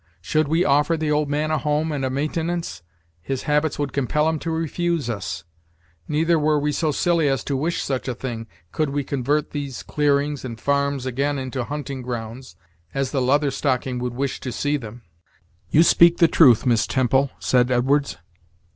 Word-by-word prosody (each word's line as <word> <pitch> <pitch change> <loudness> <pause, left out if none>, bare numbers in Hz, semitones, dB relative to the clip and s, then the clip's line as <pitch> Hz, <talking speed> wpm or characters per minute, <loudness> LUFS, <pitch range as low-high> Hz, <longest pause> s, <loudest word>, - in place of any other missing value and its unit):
Should 155 - 0
we 165 +4 +2
offer 145 +4 +3
the 155 -1 -1
old 150 -1 +1
man 150 +2 -1
a 155 - +1
home' 150 +1 0
and 145 -3 -2
a 130 - 0
maintenance, 160 - -2 0.4
his 135 +6 -4
habits 150 0 +1
would 145 -2 -3
compel 145 +3 +1
him 160 -1 0
to 165 - -4
refuse 165 -3 -1
us. 90 -5 -5 0.6
Neither 160 +2 +2
were 150 0 +2
we 150 +1 0
so 155 +1 0
silly 165 +1 +1
as 135 -1 0
to 140 - -2
wish 160 +6 -1
such 135 -1 -3
a 125 - -2
thing, 115 -2 -5 0.2
could 155 -2 -1
we 140 +1 -1
convert 140 +2 -1
these 140 -3 -5
clearings 145 -1 0
and 115 -3 -6
farms 140 0 0
again 140 +3 -1
into 130 -1 -3
hunting 140 -2 -5
grounds, 120 +1 -6 0.4
as 135 -1 -1
the 135 - 0
Leather 140 +3 +2
Stocking 130 -2 -1
would 125 -1 -3
wish 135 +1 -2
to 130 - -5
see 145 +5 -1
them." 115 -3 -7 0.7
"You 160 - +5
speak 170 0 +5
the 170 - +5
truth, 130 -9 +5
Miss 120 -3 +2
Temple," 130 +1 +2
said 125 -1 +2
Edwards. 135 +3 +1
140 Hz, 185 wpm, -22 LUFS, 130-150 Hz, 0.7 s, You